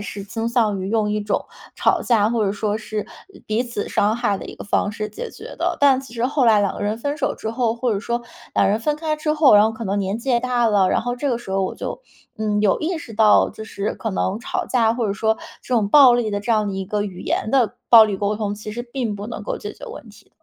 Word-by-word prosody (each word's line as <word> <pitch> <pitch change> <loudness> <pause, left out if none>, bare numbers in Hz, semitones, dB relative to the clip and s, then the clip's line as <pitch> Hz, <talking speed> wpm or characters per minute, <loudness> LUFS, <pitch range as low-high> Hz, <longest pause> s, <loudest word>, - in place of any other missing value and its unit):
是 205 -1 -6
倾 225 +3 -3
向 220 -5 +1
于 190 - -4
用 215 -1 +1
一 210 - -1
种 205 0 -1 0.3
吵 - - +2
架 235 -3 +2
啊， 210 - +2
或 230 -2 +1
者 195 - 0
说 210 +1 -2
是 215 -1 -5 0.4
彼 215 +3 0
此 235 -4 -5
伤 210 +2 +2
害 205 -4 0
的 - - -8
一 - - -9
个 - - -9
方 205 0 0
式 210 0 -4
解 480 0 -7
决 - - -10
的。 - - 0
但 275 -2 +5
其 260 -3 -13
实 235 0 -1
后 270 0 +1
来 215 -2 +5
两 200 - 0
个 - - -8
人 210 +1 -1
分 285 +6 -3
手 - - 0
之 220 - -5
后， 230 -1 0
或 240 -1 -1
者 200 - -2
说 235 +2 -2 0.3
俩 - - +3
人 210 +3 +1
分 295 +6 0
开 310 0 -2
之 305 0 -1
后， 300 -6 +6
然 205 0 +7
后 220 - +2
可 225 +1 -7
能 200 0 -1
年 195 +1 -1
纪 235 +4 -4
也 240 -1 +3
大 245 -1 +1
了， 200 -4 +3
然 - - +2
后 245 - -2
这 280 +2 -1
个 235 - 0
时 235 - -10
候 195 0 +1
我 - - -4
就 - - -6 0.4
嗯， 210 -1 0
有 205 -2 +3
意 335 +2 -1
识 235 -7 -10
到， 215 0 +5
就 220 - -9
是 205 -1 -4
可 225 - -4
能 190 +1 -1
吵 235 - -3
架， 230 -3 +2
或 235 -2 -1
者 200 - 0
说 220 +2 0 0.3
这 255 - -2
种 215 -4 +2
暴 270 +1 +8
力 240 -3 0
的 205 0 -2
这 230 +3 0
样 215 -2 +1
的 195 - -3
一 190 0 -3
个 205 +2 -2
语 195 -3 -7
言 220 - -2
的 245 -6 +2
暴 230 -2 +9
力 205 -2 -2
沟 205 +2 -1
通， 205 -1 -2
其 215 +1 -8
实 240 +3 -4
并 240 -3 -3
不 205 +1 -6
能 235 - -6
够 - - -3
解 - - -6
决 - - -11
问 465 - -10
题。 - - -18
220 Hz, 310 characters per minute, -21 LUFS, 205-245 Hz, 0.4 s, 暴